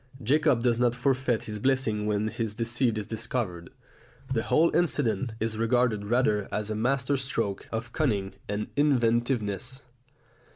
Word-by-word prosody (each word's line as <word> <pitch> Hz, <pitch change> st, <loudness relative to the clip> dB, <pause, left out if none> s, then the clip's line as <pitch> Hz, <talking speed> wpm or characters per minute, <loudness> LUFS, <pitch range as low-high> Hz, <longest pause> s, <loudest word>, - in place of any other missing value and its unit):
Jacob 140 Hz, -1 st, +3 dB
does 120 Hz, -2 st, +2 dB
not 120 Hz, -1 st, +2 dB
forfeit 130 Hz, -2 st, +1 dB
his 105 Hz, -1 st, -5 dB
blessing 110 Hz, -4 st, +1 dB
when 105 Hz, 0 st, 0 dB
his 110 Hz, -2 st, -3 dB
deceit 115 Hz, 0 st, 0 dB
is 105 Hz, -, -3 dB
discovered. 110 Hz, -6 st, -3 dB, 0.6 s
The 115 Hz, -, +1 dB
whole 165 Hz, +8 st, +3 dB
incident 135 Hz, -8 st, +1 dB
is 110 Hz, 0 st, -2 dB
regarded 115 Hz, -2 st, +2 dB
rather 105 Hz, -3 st, +1 dB
as 105 Hz, 0 st, -2 dB
a -, -, -1 dB
master 130 Hz, +4 st, +1 dB
stroke 115 Hz, -7 st, -2 dB
of 115 Hz, +1 st, -4 dB
cunning 105 Hz, -11 st, 0 dB, 0.2 s
and 105 Hz, +1 st, -2 dB
inventiveness. 125 Hz, -2 st, +1 dB
115 Hz, 140 wpm, -27 LUFS, 105-130 Hz, 0.6 s, Jacob